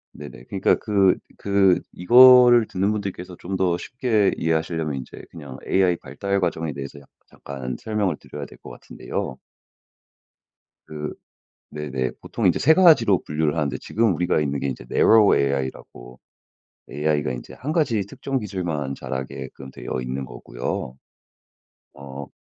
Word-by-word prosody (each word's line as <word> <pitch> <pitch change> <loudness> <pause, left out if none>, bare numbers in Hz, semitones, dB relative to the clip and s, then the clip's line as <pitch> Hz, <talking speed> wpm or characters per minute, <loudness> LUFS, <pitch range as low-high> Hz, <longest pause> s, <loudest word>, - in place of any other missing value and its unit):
네네. 70 -4 -10
그러니까 95 - +2
그 100 -4 +2 0.2
그 100 -2 +3
이거를 120 +3 +7
듣는 95 +3 0
분들께서 95 -4 -5
좀 95 +2 -7
더 90 -2 +1
쉽게 115 -6 +1
이해하시려면 80 -2 -1
인제 65 - -9
그냥 70 -6 -10
AI 95 -2 +3
발달 100 +3 -3
과정에 80 -3 -1
대해서 70 +1 -8
약 70 - -19 0.2
잠깐 65 -3 -7
설명을 105 -7 -1
드려야 - - -8
될 - - -16
것 - - -12
같은데요. 65 - -6 1.5
그 75 -1 -6 0.6
네네. 70 -4 -3
보통 - - -1
이제 - - +3
3 160 +3 +5
가지로 150 - +5
분류를 75 0 -1
하는데 75 -5 -1
지금 110 -4 +1
우리가 90 -2 +1
있는 70 -2 -2
게 70 - -2
이제 60 -2 -5
Narrow 110 -2 +5
AI라고 65 -2 -4 0.7
AI가 75 -2 -1
인제 - - -9
1 145 +5 -5
가지 125 -11 +1
특정 135 +5 -3
기술만 85 - -3
자라게끔 65 0 -7
되어 65 - -5
있는 65 +2 -4
거고요. - - -5 1.0
어 70 0 -9
80 Hz, 310 characters per minute, -23 LUFS, 70-100 Hz, 1.5 s, 이거를